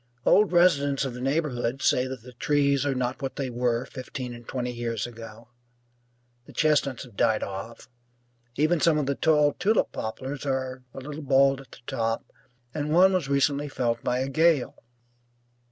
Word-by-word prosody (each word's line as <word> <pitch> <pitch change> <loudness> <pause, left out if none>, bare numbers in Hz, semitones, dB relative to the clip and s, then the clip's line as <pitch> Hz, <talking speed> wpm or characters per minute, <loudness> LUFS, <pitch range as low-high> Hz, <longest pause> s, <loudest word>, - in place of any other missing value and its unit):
Old 210 -2 +5
residents 145 -6 +3
of 130 - -4
the 125 - -7
neighbourhood 135 -3 -1
say 125 +1 +3
that 130 -3 -7
the 125 0 -12
trees 140 +2 +1
are 135 - 0
not 125 +1 -2
what 135 -1 -4
they 135 -3 -3
were 120 0 0
fifteen 130 -2 -7
and 120 -1 -12
twenty 125 -1 -3
years 115 -2 -3
ago; 115 -1 -11 1.0
the - - -13
chestnuts 145 -5 +1
have 120 -6 -15
died 110 +1 +2
off; 100 +4 -7 0.7
even 155 +4 +2
some 165 -2 +4
of 150 - 0
the 140 - 0
tall 150 0 +3
tulip 215 +3 +1
poplars 130 +5 -5
are 130 -2 -2
a - - -5
little 150 +3 -7
bald 135 -1 +3
at 135 - -17
the - - -12
top, 115 -3 -2 0.5
and 150 0 -2
one 185 +4 +6
was 175 -7 0
recently 140 +1 +1
felled 120 -4 -1
by 125 - 0
a 130 +1 -1
gale. 155 -1 +2
135 Hz, 175 wpm, -26 LUFS, 120-145 Hz, 1.0 s, one